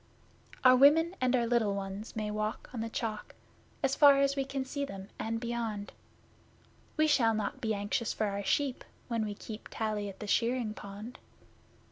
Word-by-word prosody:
Our 255 0 +8
women 320 +7 +5
and 255 0 +3
our 240 -2 +2
little 230 -4 +2
ones 195 +3 -6
may 215 -1 -2
walk 215 +1 -3
on 240 - -4
the 225 - -3
Chalk, 220 -2 -4 0.5
As 270 0 +2
far 285 -2 +7
as 275 0 +2
we 275 - 0
can 270 0 -3
see 285 +2 -3
them 195 -7 -7
and 225 +1 -2
beyond. 230 -3 -3 1.1
We 310 - +4
shall 235 -7 +3
not 215 -2 -3
be 220 -2 0
anxious 205 +2 -1
for 215 - -1
our 200 0 -2
sheep 275 +3 0 0.3
when 230 -2 0
we 210 -1 -4
keep 215 +1 -8
Tally 215 -2 -2
at 195 - -11
the 210 - -5
shearing 235 +1 +1
pond. 210 +3 -9
225 Hz, 180 wpm, -31 LUFS, 210-260 Hz, 1.1 s, Our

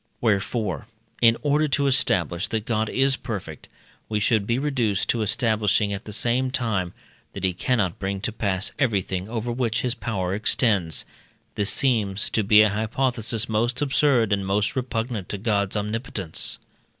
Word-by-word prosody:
Wherefore, 105 -3 -1 0.3
in 115 -1 +5
order 150 +1 +2
to 140 0 +1
establish 90 -9 +1
that 110 -1 -3
God 110 -2 0
is 135 0 +2
perfect, 100 - -6 0.4
we 105 -1 0
should 105 -1 +1
be 115 - +1
reduced 125 -8 0
to 115 - +1
establishing 105 -2 +1
at 100 - -6
the 105 - -7
same 120 +4 +1
time, 110 -9 -1 0.4
that 100 - -7
he 95 -1 +2
cannot 95 -2 0
bring 95 0 -2
to 115 - -1
pass 100 -2 0
everything 100 -6 0
over 120 +1 -3
which 120 -2 0
his 125 -2 0
power 95 -7 -3
extends; 100 - +1 0.5
this 105 -1 0
seems 105 -7 +1
to 110 - +1
be 105 +1 +7
a 105 - +3
hypothesis 115 +1 0
most 115 +3 0
absurd, 135 -6 +2
and 100 -1 -1
most 105 +2 0
repugnant 115 -5 -3
to 100 - -3
God's 100 -1 0
omnipotence. 105 -4 -3
110 Hz, 160 wpm, -24 LUFS, 100-120 Hz, 0.5 s, be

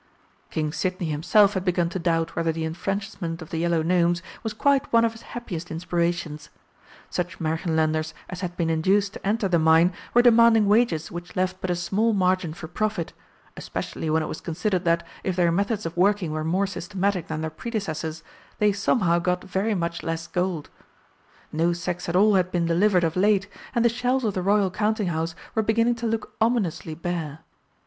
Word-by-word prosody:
King 155 -1 -2
Sidney 180 -3 -2
himself 195 +7 +4
had 190 - -2
begun 180 -2 +1
to 190 - -4
doubt 165 -1 0
whether 165 0 +1
the 160 0 -3
enfranchisement 175 0 -3
of 160 - -10
the 160 - -2
Yellow 170 -1 +1
Gnomes 175 0 +2 0.2
was 220 - -3
quite 275 +5 +1
one 230 0 +5
of 230 - +1
his 225 - -13 0.2
happiest 180 -8 -6
inspirations. 170 -2 -2 0.6
Such 180 0 -3
Märchenlanders 160 -1 0
as 180 0 -7
had 175 -1 -4
been 165 -2 +1
induced 195 +5 +2
to - - -10
enter 210 0 +1
the 175 -3 +2
mine 160 +3 +5 0.2
were 240 - +7
demanding 230 -2 +6
wages 205 -6 +2
which 175 +1 -8
left 185 0 -1
but 185 - -3
a 175 - +1
small 210 +6 +1
margin 185 -4 +1
for 165 - -8
profit, 210 -2 -2 0.4
especially 160 - -4
when 160 +1 +2
it - - -3
was - - -6
considered 180 +2 -1
that, 170 0 +2 0.2
if 185 - -1
their 175 -2 +3
methods 205 +4 0
of 165 - -4
working 190 -2 +2
were 155 0 -2
more 180 +5 +1
systematic 195 -1 -2
than 155 0 -3
their 160 0 -3
predecessors', 165 -6 -4 0.3
they 210 -1 +3
somehow 195 -3 +2
got 180 +1 -1
very 195 +3 -1
much 170 -2 -2
less 165 0 -3
gold. 175 -3 -2 0.8
No 165 +2 +1
sacks 175 0 -4
at 170 - -1
all 210 +3 +5
had 185 -2 +2
been 175 -2 +1
delivered 180 +2 +3
of 165 -1 0
late, 200 +1 +3 0.3
and 235 0 +3
the - - +8
shelves 245 +2 0
of 210 - 0
the 185 - -2
Royal 200 0 +2
Counting 210 -1 0
house 165 0 -2 0.2
were 220 - +2
beginning 230 +2 +2
to 235 0 -3
look 225 0 -3
ominously 205 -9 0
bare. 165 -3 -4
180 Hz, 190 wpm, -25 LUFS, 165-205 Hz, 0.8 s, the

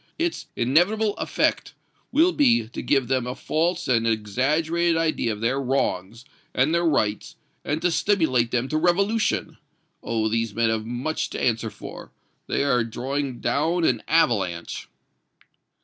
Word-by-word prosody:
Its 335 +1 -2
inevitable 190 - +2
effect - - -1 0.4
will 325 +6 +4
be 250 - +3
to 115 - -7
give 135 -4 +1
them 130 -1 0
a 125 - -4
false 170 +3 -1
and 115 -2 +2
exaggerated 150 +10 +1
idea 155 -8 0
of 105 0 -6
their 130 +4 0
wrongs 115 -4 -2 0.3
and 135 +5 +2
their 170 0 +2
rights, 110 -10 0 0.3
and 155 +3 -2
to 180 - +3
stimulate 160 - +2
them 125 +1 0
to 155 - -1
revolution. 200 +6 +1 0.4
Oh! 110 -1 -1
these 115 -1 -1
men 115 -1 +2
have 110 0 -2
much 125 +7 -2
to - - -5
answer 115 -2 0
for. - - -10 0.4
They - - 0
are 125 -4 +2
drawing 130 +3 -4
down 165 +4 +1
an 120 -8 +2
avalanche." 100 - 0
135 Hz, 150 wpm, -24 LUFS, 115-170 Hz, 0.4 s, will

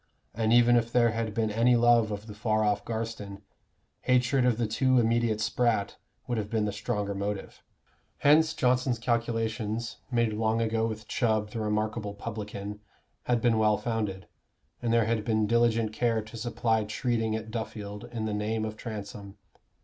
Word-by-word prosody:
And 110 0 0
even 120 0 +6
if 115 0 0
there 120 -2 +4
had 115 -2 -3
been 110 -2 0
any 115 +3 +4
love 120 -2 +4
of 105 +1 -5
the 105 - -9
far 110 +1 0
off 105 -1 +1
Garstin, 110 -3 -5 0.6
hatred 125 +1 +2
of 120 -3 +2
the 120 - 0
too 130 +4 +2
immediate 115 -2 +2
Spratt 110 -1 0 0.3
would 120 -2 -1
have 105 -1 -4
been 110 -2 0
the 105 - -1
stronger 105 0 -2
motive. 100 0 -4 0.6
Hence 155 +2 +4
Johnson's 125 0 +2
calculations, 115 -1 -2
made 115 -3 +1
long 110 +1 +1
ago 115 0 +1
with 110 -1 -6
Chubb, 110 -3 0
the 115 - -4
remarkable 105 0 -2
publican, 105 -1 -6 0.5
had 120 -2 +1
been 115 -2 +3
well 105 -1 +3
founded, 105 -6 -3 0.6
and 120 - 0
there 115 -1 +4
had 110 -1 0
been 110 -1 +1
diligent 115 -1 +2
care 115 -1 +1
to 110 +2 -12
supply 115 -1 0
treating 110 +1 -1
at 110 0 -5
Duffield 105 -2 -5
in 110 -2 -3
the 110 - -2
name 110 +1 -1
of 110 0 -5
Transome. 100 -3 -7
110 Hz, 170 wpm, -28 LUFS, 105-115 Hz, 0.6 s, even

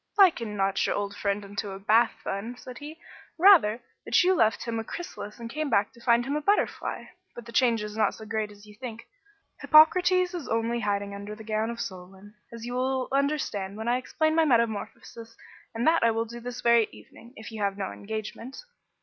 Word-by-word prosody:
"Liken 240 - +4
not 195 0 +1
your - - 0
old 205 0 -3
friend 200 0 -2
unto 200 +1 -5
a 195 0 -7
Bath 220 +3 +3
bun," 225 +5 -4
said 250 0 -10
he. 300 +2 -8
"Say, - - -34 0.4
rather, 325 - +6 0.2
that - - +3
you 370 +1 +4
left 225 -10 +2
him 230 -1 -3
a - - -3
chrysalis 225 -7 -7
and 230 - -6
come 300 +5 -3
back 200 -3 +1
to 235 - -18
find 235 0 +3
him 280 +2 -2
a 300 - -1
butterfly. 405 +7 0 0.3
But 240 - -9
the 235 - -10
change 230 -2 +2
is 210 0 -6
not 215 -2 +1
so 220 - -10
great 220 -1 -2
as 205 0 -15
you 210 - -14
think. 230 +1 -8 0.5
Hippocrates 360 +4 +5
is 345 -6 -5
only 230 +1 0
hiding 200 -2 -2
under 200 +1 -7
the 220 - -11
gown 215 +1 -1
of 235 0 -6
Solon, 190 +1 -8 0.2
as 230 0 -8
you 245 - -5
will 260 +1 -1
understand 270 -9 -1
when 220 +1 -5
I 240 +1 +2
explain 315 +5 0
my 325 0 +4
metamorphosis; 230 -2 -1 0.4
and 230 - -1
that 330 -3 +4
I 230 - +5
will 225 0 0
do 235 +1 -9
this 245 0 -7
very 235 -2 +4
evening, 235 +2 -15
if 220 0 -10
you 220 -1 -6
have 200 -1 0
no 195 -2 -3
engagement." 220 +4 -7
230 Hz, 215 wpm, -27 LUFS, 210-255 Hz, 0.5 s, rather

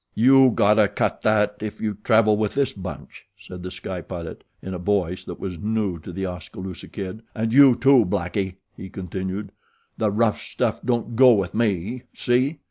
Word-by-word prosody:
"You 130 +3 +6
gotta 105 -2 +4
cut - - -2
that 105 -1 +2
if 110 -1 -5
you 105 -2 -3
travel 110 -2 +4
with 105 +2 -1
this 135 -1 +1
bunch," 95 0 -9
said 90 -2 -10
The 90 - -6
Sky 90 0 -6
Pilot 85 -2 -8 0.2
in 95 - -7
a 90 - -5
voice 90 -1 -1
that - - -8
was 90 -4 -5
new 105 -4 -1
to 85 - -9
The 95 +2 -4
Oskaloosa 90 0 -7
Kid; 100 +1 -7
"and 110 0 -1
you, 135 -2 +7
too, 130 0 +5
Blackie," 90 +2 -2 0.2
he 95 - -9
continued. 95 +2 -5 0.5
"The 110 - +2
rough 105 +1 +1
stuff - - -2
don't 120 -1 -1
go 130 0 +7
with 100 -5 -1
me, 110 +1 -1
see?" 130 +5 +1
105 Hz, 180 wpm, -23 LUFS, 95-115 Hz, 0.5 s, you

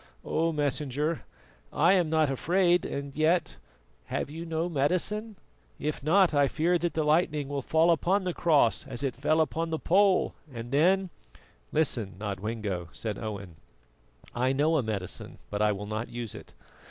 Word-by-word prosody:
Oh! 165 +1 +1
Messenger, 150 +1 -1 0.5
I 170 +5 +4
am 180 -5 +2
not 160 -1 +3
afraid 175 +6 +2
and 140 0 -5
yet, 160 +1 +1 0.5
have - - -3
you 165 +2 -6
no 165 +1 -1
medicine? 185 +8 0 0.4
If 150 0 -3
not, 175 +4 +4
I 145 -1 +4
fear 170 +5 +1
that 170 +1 -2
the 160 - +1
lightning 150 -2 +2
will 140 -1 -2
fall 160 +5 +3
upon 185 +4 +2
the 180 -1 -2
cross 150 -10 +3
as 120 - -6
it 135 -3 0
fell 155 +5 +1
upon 165 +1 0
the 160 - -1
pole 190 +3 +3 0.2
and 120 -1 -7
then 180 +6 +3 0.3
" 60 0 -32
"Listen, 120 - 0
Nodwengo," 100 -3 -4
said 110 -3 -5
Owen, 100 -6 -6 0.8
"I 130 +2 +1
know 155 +4 +2
a - - +2
medicine, 105 -5 -5
but 105 0 -2
I 105 0 +4
will 100 0 -4
not 110 +3 -4
use 120 -3 -6
it. - - -11
150 Hz, 165 wpm, -28 LUFS, 120-170 Hz, 0.8 s, I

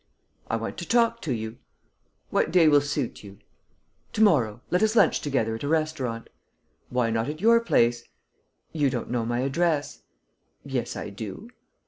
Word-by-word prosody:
"I - - 0
want 115 0 -4
to 175 - -6
talk 230 0 +2
to - - -3
you." 110 -1 -4 0.7
"What - - +1
day 170 -2 +5
will 145 -1 +6
suit 145 -5 -3
you?" 100 -1 -12 0.8
"To 220 - +3
morrow. 125 - +3
Let 180 - +2
us 220 +1 +2
lunch - - +4
together 130 -6 0
at 110 - -6
a - - -2
restaurant." 150 -7 -1 0.6
"Why 125 -2 0
not 115 +4 -1
at 155 +1 -5
your 230 +4 +5
place?" 120 - +2 0.7
"You 145 -4 +1
don't 125 - -4
know 120 -2 -1
my 120 +1 -1
address." 145 +2 0 0.6
"Yes, - - -3
I 105 - -6
do." 110 - -8
140 Hz, 165 wpm, -26 LUFS, 115-170 Hz, 0.8 s, will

